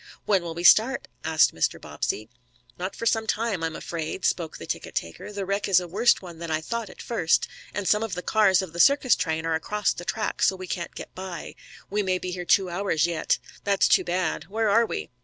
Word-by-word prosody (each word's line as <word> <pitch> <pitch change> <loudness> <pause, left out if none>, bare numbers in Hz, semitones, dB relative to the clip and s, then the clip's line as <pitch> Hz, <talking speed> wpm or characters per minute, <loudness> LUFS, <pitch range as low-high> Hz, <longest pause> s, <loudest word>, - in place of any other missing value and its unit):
"When 195 -3 +3
will 170 -1 -6
we 170 - -4
start?" 230 +8 +5 0.2
asked 160 -1 +4
Mr. 80 - 0
Bobbsey. 110 - -3 0.5
"Not 185 +2 -4
for 230 - -5
some 225 -1 +1
time, 215 -7 -1
I'm 160 -1 -2
afraid," 165 +2 -4
spoke 165 -3 0
the - - -8
tickettaker. 85 - -5
"The 200 -1 -4
wreck 200 +2 -1
is 190 -3 +5
a 180 - -6
worse 215 +8 +3
one 170 -3 -10
than 170 -1 -5
I 155 0 +1
thought 230 +6 -4
at - - -11
first, 180 -9 +1 0.2
and 205 -2 -3
some 210 +5 +3
of 225 -5 -3
the 180 - -5
cars 195 -4 +4
of 175 -3 -8
the 170 - -7
circus 275 +2 +5
train 160 0 -2
are 165 - 0
across 210 +6 0
the 175 - -8
track 215 +4 -2
so 190 - +4
we 185 0 -7
can't 175 -1 -5
get - - -8
by. 185 -2 -7 0.4
We 210 +1 +1
may 185 -2 0
be 180 0 -5
here 180 -1 -5
two 195 +1 +4
hours 175 -3 0
yet." 170 -2 0 0.3
"That's 200 -1 +3
too - - +4
bad. 175 -1 -1
Where 220 +2 0
are 230 +3 +4
we?" - - -5
185 Hz, 230 wpm, -25 LUFS, 170-210 Hz, 0.5 s, start